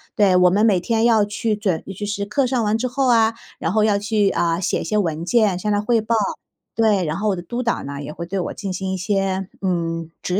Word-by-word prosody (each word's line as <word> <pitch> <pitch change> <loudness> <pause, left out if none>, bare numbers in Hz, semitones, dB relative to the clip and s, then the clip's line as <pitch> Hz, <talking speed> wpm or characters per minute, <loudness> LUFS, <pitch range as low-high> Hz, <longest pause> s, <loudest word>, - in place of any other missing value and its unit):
对， 200 -4 +4
我 180 0 +6
们 205 +4 +3
每 200 -5 +4
天 225 +5 0
要 220 -3 +4
去 215 +2 -2
准 195 -6 -1
其 205 - -4
实 205 0 -3
课 255 +6 0
上 245 -2 0
完 210 +1 +1
之 255 +3 -1
后 265 +2 0
啊， 225 -2 +4 0.3
然 165 - -1
后 215 0 +3
要 210 -2 +3
去， 210 -1 +1
呃， 170 -1 0
写 - - 0
一 - - -4
些 215 - 0
文 165 -5 -1
件， 200 -2 +2
向 210 - -2
他 205 0 +1
汇 230 +1 +2
报。 225 +2 0 0.6
对， 210 -5 +2
然 155 +1 -2
后 210 +2 0
我 195 - +1
的 - - -5
督 240 +9 -4
导 235 - -1
呢， 140 0 -6
也 145 - -6
会 170 - -6
对 195 +3 -4
我 180 - -3
进 200 -2 -5
行 190 +1 -3
一 - - -2
些， 195 0 -1
嗯， 165 -3 -2
指 180 - -2
205 Hz, 275 characters per minute, -21 LUFS, 180-220 Hz, 0.6 s, 我